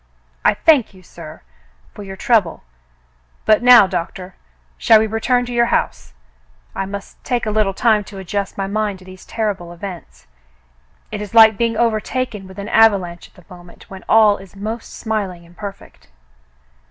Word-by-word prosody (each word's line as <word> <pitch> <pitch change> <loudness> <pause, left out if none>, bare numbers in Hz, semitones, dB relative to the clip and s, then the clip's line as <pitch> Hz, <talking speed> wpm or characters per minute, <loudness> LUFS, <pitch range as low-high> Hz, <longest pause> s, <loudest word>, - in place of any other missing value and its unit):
"I - - +3
thank 280 -11 +2
you, 185 - -17
sir, 165 - -12 0.5
for - - -10
your 195 -1 -8
trouble, 200 -5 +1 0.4
— - - -39
but 215 +1 +4
now. 245 -3 +8
Doctor, 185 0 -5 0.4
shall 220 - +5
we 220 - +2
return 245 +3 0
to 245 - -7
your 235 0 +2
house? - - -2 0.6
I 195 - -4
must 200 0 -9
take 245 -3 -2
a 215 - -2
little 210 -2 0
time 220 -2 +2
to 200 - -11
adjust 195 +1 -4
my 195 - -2
mind 205 0 -2
to 185 - -17
these 185 0 -14
terrible 200 -6 -3
events. 170 - -10 0.9
It - - -5
is 210 +1 -8
like 220 -1 +8
being 230 +1 -1
overtaken 225 -2 -2
with 190 +1 -14
an 200 +1 -6
avalanche 195 -6 +2
at - - -34
the 180 0 -15
moment 175 +1 -17
when 190 -1 -10
all 215 -2 +5
is 195 0 -15
most 220 +3 -6
smiling 195 -6 -4
and 170 +1 -20
perfect." 200 0 -10
200 Hz, 175 wpm, -18 LUFS, 185-220 Hz, 0.9 s, now